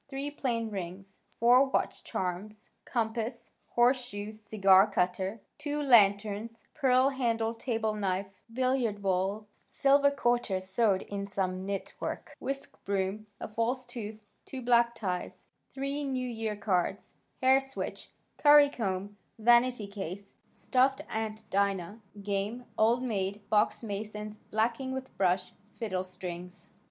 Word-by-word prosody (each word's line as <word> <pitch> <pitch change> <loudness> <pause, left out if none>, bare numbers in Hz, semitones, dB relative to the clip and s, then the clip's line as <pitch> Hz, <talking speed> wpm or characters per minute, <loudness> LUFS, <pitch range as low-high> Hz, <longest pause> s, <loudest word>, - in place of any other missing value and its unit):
Three 280 +1 -4
plain 230 -6 -2
rings, 190 0 -7 0.2
four 245 +3 +7
watch 270 - -1
charms, 190 +4 -4
compass, 235 0 -2 0.2
horseshoe 240 -4 +1
cigar 205 -2 +4
cutter, 190 +3 -1 0.2
two 295 0 -2
lanterns, 220 -3 +3
pearl 260 -2 +4
handled 230 -4 -1
table 225 -3 -1
knife, 195 -2 -1 0.3
billiard 250 -4 0
ball, 195 +3 0 0.2
silver 280 +1 +4
quarter 240 -7 +1
sewed 190 +1 +1
in 200 -1 -5
some 190 -1 -2
knit 200 -1 -3
work, - - -5
whisk 275 +1 -6
broom, 200 +2 -2
a - - -5
false 235 +4 -1
tooth, 215 -3 -7 0.2
two 260 -2 -7
black 235 -1 +4
ties, 180 -4 -4 0.2
three 275 +2 -3
New 260 -2 -2
Year 225 -3 -3
cards, 200 -1 -1 0.3
hair 265 +1 +5
switch, 270 0 -5 0.3
curry 290 -1 +7
comb, 200 -3 -3 0.2
vanity 240 0 +4
case, 200 -1 -7 0.2
stuffed 265 +2 +1
Aunt 220 0 -4
Dinah, 200 +1 0 0.2
game 205 +5 -2
"Old 235 +3 +3
Maid," 200 -3 -2
box 210 +2 +2
Mason's 210 0 -5
blacking 230 +5 -1
with 260 0 -6
brush, 185 0 +1 0.2
fiddle 190 -6 -2
strings. 180 -1 -8
220 Hz, 125 wpm, -30 LUFS, 195-250 Hz, 0.3 s, four